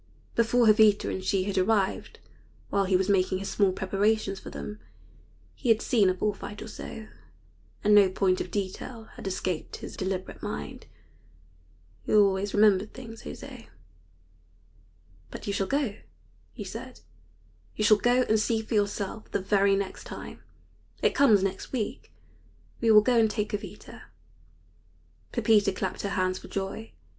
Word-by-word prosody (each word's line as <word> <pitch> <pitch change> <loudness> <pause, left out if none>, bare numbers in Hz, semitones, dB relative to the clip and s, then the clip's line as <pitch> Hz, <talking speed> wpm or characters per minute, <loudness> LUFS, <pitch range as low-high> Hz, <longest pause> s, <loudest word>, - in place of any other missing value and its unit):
Before 235 +1 +3
Jovita 215 -1 +5
and 190 - -4
she 190 0 +1
had 195 -1 -1
arrived, 195 0 0 0.5
while 200 -1 +2
he 190 0 +2
was 185 +1 +2
making 185 -2 +2
his 195 +1 -5
small 200 -3 +3
preparations 195 +1 0
for - - -9
them, 210 0 -7 0.7
he 250 - -4
had 225 -1 +5
seen 210 -7 +3
a 185 - 0
bull 210 +3 0
fight 205 +1 -8
or - - -9
so, 220 0 -8 0.8
and 210 0 +4
no 205 -2 +7
point 185 0 +1
of - - -5
detail 215 +3 -5
had - - -8
escaped 185 -3 -3
his - - -8
deliberate 190 -1 -4
mind. 75 0 -6 1.2
He - - +2
always 200 -1 +3
remembered 205 -1 +4
things 225 -3 -9
José. - - -9 1.6
"But - - -9
you 200 - -2
shall 195 -1 -1
go," 270 -6 -1 0.5
he - - -7
said; - - -8 0.7
"you 215 - -1
shall 210 0 +6
go 245 +3 +3
and 220 -2 +2
see 220 +1 0
for 220 - -6
yourself 205 0 -1
the - - -1
very 195 0 +3
next 195 -1 -4
time. - - -9 0.6
It - - +3
comes 215 -9 +5
next 195 0 -3
week. 230 -6 -4 0.7
We 230 - +1
will 215 -1 +8
go 245 -1 +3
and 220 -1 +4
take 210 0 -2
Jovita." 205 - -7 1.3
Pepita 210 -3 +3
clapped 190 0 -4
her 200 - -2
hands 185 -1 0
for - - -12
joy. 195 +3 -5
205 Hz, 155 wpm, -27 LUFS, 190-220 Hz, 1.6 s, will